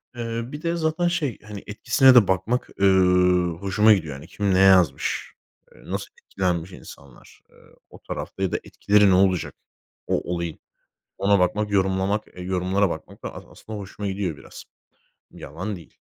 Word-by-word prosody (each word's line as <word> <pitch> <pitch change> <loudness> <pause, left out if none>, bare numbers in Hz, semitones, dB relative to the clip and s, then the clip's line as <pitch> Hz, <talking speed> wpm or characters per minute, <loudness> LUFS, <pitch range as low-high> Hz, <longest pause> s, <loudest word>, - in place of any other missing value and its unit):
Eee, 115 -1 -3
bir 145 +4 -8
de 170 +1 -1
zaten 165 +1 0
şey 150 -8 -2
hani, 105 -2 -9
etkisine 130 +5 +4
de 115 -6 +7
bakmak, 95 +7 -1
eee, 100 - +4 0.7
hoşuma 105 +3 +4
gidiyor. 80 -8 -2
Yani, 75 +5 -11
kim 100 0 -1
ne 95 - +3
yazmış? 95 -5 +3 0.4
Eee, - - -18
nasıl - - -4 0.2
etkilenmiş 90 -1 -2
insanlar, 70 -7 -15
eee, - - -26 0.3
o - - -15
tarafta? 95 - -6
Ya 95 - 0
da - - 0
etkileri 105 -1 +3
ne - - +4
olacak, 95 -2 +1 0.5
o - - 0
olayı? 85 -2 -4 0.6
Ona 100 0 +3
bakmak, 105 +3 0
yorumlamak, 95 +1 0
eee, 90 - -11
yorumlara 95 +1 0
bakmak 80 - -8
da - - -6
as - - -10
aslında, 110 -1 -9
hoşuma 100 +1 -6
gidiyor 95 -5 -3
biraz. - - -12 0.7
Yalan 95 +9 -6
değil. 85 - -15
95 Hz, 165 wpm, -23 LUFS, 90-105 Hz, 0.7 s, de